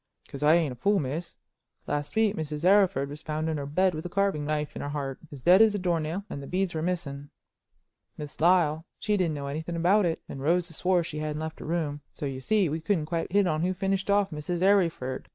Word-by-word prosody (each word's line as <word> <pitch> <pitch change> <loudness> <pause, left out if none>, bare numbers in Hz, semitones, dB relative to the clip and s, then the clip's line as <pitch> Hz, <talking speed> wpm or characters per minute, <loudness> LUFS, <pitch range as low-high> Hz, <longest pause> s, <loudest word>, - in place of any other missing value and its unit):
"'Cause 140 - -8
I 150 +2 +6
ain't 165 -5 +1
a - - -7
fool, 200 - +2
miss. 155 +3 -4 0.5
Last 145 +4 -3
week 220 -2 +3
Mrs. 155 -1 -4
Arryford 185 -9 +4
was 145 +2 -8
found 155 +1 -3
in 160 -1 -1
her 140 -1 -4
bed 185 +5 +2
with 155 0 -5
a 175 - -5
carving 195 -6 0
knife 150 0 -2
in - - -5
her 145 - -4
heart, 140 -2 -4
as 140 -4 -10
dead 185 +4 +7
as 220 -2 +5
a - - +1
door 175 -3 0
nail, 160 +6 -3
and 140 - -6
the 140 - -8
beads 185 0 -1
were 160 - -2
missing. 150 -5 -3 0.9
Miss 150 0 -8
Lyle, 165 -3 +3
she 210 -1 0
didn't 175 -6 0
know 140 -1 -5
anything 160 +4 -4
about 180 +4 +3
it, 165 - -2
and 135 - -7
Rosa 170 +3 +1
swore 180 +2 +1
she 150 -1 -5
hadn't 150 0 -3
left 160 0 -5
her - - -8
room, 155 -3 -2
so, - - -5
you 135 -1 -4
see, 210 +4 +2
we 160 +2 -3
couldn't 165 -2 0
quite 165 +1 -3
hit 200 +1 +4
on 155 -3 0
who 185 +2 0
finished 195 +1 -1
off 200 -1 +3
Mrs. 165 +4 -3
Arryford. 170 -10 +1
160 Hz, 240 wpm, -27 LUFS, 150-185 Hz, 0.9 s, dead